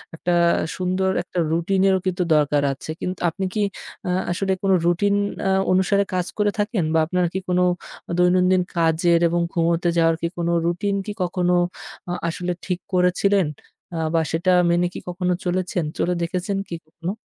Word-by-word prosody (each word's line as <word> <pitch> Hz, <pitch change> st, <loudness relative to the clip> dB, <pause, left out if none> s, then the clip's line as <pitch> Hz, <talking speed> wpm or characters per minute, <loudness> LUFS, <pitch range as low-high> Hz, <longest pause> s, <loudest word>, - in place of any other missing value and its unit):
একটা 175 Hz, +2 st, -1 dB, 0.4 s
সুন্দর 185 Hz, +1 st, 0 dB
একটা 180 Hz, -, -4 dB
রুটিনেরও 190 Hz, +3 st, +2 dB
কিন্তু 185 Hz, -1 st, 0 dB
দরকার 145 Hz, -1 st, +2 dB
আছে। 135 Hz, -, -11 dB
কিন্তু 185 Hz, 0 st, -3 dB
আপনি 190 Hz, +4 st, -4 dB
কি, 215 Hz, -, 0 dB, 0.5 s
আ -, -, -1 dB, 0.2 s
আসলে 190 Hz, +2 st, -1 dB
কোনো 195 Hz, -1 st, +4 dB
রুটিন 200 Hz, +4 st, +2 dB, 0.3 s
আ -, -, +2 dB, 0.2 s
অনুসারে 190 Hz, +2 st, +3 dB
কাজ 180 Hz, -1 st, 0 dB
করে 210 Hz, -1 st, +2 dB
থাকেন 205 Hz, -2 st, 0 dB
বা 160 Hz, -, +4 dB
আপনার 180 Hz, +2 st, 0 dB
কি 190 Hz, -, -1 dB
কোনো 180 Hz, 0 st, +3 dB, 0.5 s
দৈনন্দিন 180 Hz, +1 st, +4 dB, 0.2 s
কাজের 170 Hz, +1 st, +3 dB
এবং 170 Hz, +1 st, 0 dB
ঘুমোতে 170 Hz, 0 st, +1 dB
যাওয়ার 165 Hz, -1 st, +4 dB
কি 170 Hz, -, +1 dB
কোনো 170 Hz, 0 st, 0 dB
রুটিন 180 Hz, +4 st, 0 dB
কি 210 Hz, -, -4 dB
কখনো 180 Hz, 0 st, 0 dB, 0.6 s
আ -, -, -1 dB, 0.2 s
আসলে 175 Hz, +2 st, -2 dB
ঠিক 180 Hz, -1 st, -2 dB
করেছিলেন? 185 Hz, +2 st, +3 dB, 0.5 s
আ -, -, -2 dB, 0.2 s
বা 165 Hz, -, +3 dB
সেটা 170 Hz, +3 st, +1 dB, 0.2 s
মেনে 175 Hz, +1 st, +2 dB
কি -, -, -6 dB
কখনো 180 Hz, 0 st, -1 dB
চলেছেন, 180 Hz, -1 st, -1 dB
চলে 180 Hz, -, +1 dB
দেখেছেন 180 Hz, +4 st, -2 dB
কি 170 Hz, -, -4 dB
কখনো? 170 Hz, +3 st, -5 dB
180 Hz, 165 wpm, -22 LUFS, 170-190 Hz, 0.6 s, কোনো